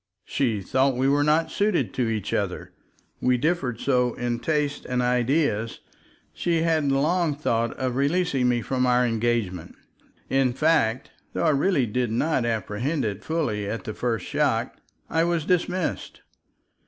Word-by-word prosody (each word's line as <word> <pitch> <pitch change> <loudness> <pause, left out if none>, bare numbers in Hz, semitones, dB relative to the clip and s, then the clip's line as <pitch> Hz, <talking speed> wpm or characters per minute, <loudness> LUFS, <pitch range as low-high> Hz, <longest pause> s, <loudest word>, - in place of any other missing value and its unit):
She 115 -7 0
thought 130 +6 +1
we 130 +1 +2
were 145 +1 +3
not 155 +2 +2
suited 205 -3 0
to 120 -3 0
each 110 -4 -3
other, - - -2 0.5
we 125 0 +3
differed 135 -5 -1
so 125 -3 +1
in 120 -1 -2
tastes 150 0 -1
and 125 -1 -2
ideas, 125 -2 +1 0.5
she 165 -2 0
had 160 -4 +2
long 155 +3 +1
thought 115 -5 -1
of 130 -2 -2
releasing 140 -2 +1
me 120 -2 0
from 130 +3 0
our 125 0 +3
engagement. 115 -6 -1 0.5
In 135 -2 +2
fact, 135 -5 +1 0.2
though - - -1
I - - +5
really 145 -1 +2
did 120 +2 -1
not 130 +1 +1
apprehend 115 +6 -1
it 105 -1 -4
fully 115 -11 -1
at 115 - -4
the 110 - -5
first 115 -6 -2
shock, - - 0 0.3
I 165 0 +1
was 170 -2 0
dismissed. 180 0 -1
130 Hz, 155 wpm, -25 LUFS, 120-155 Hz, 0.5 s, I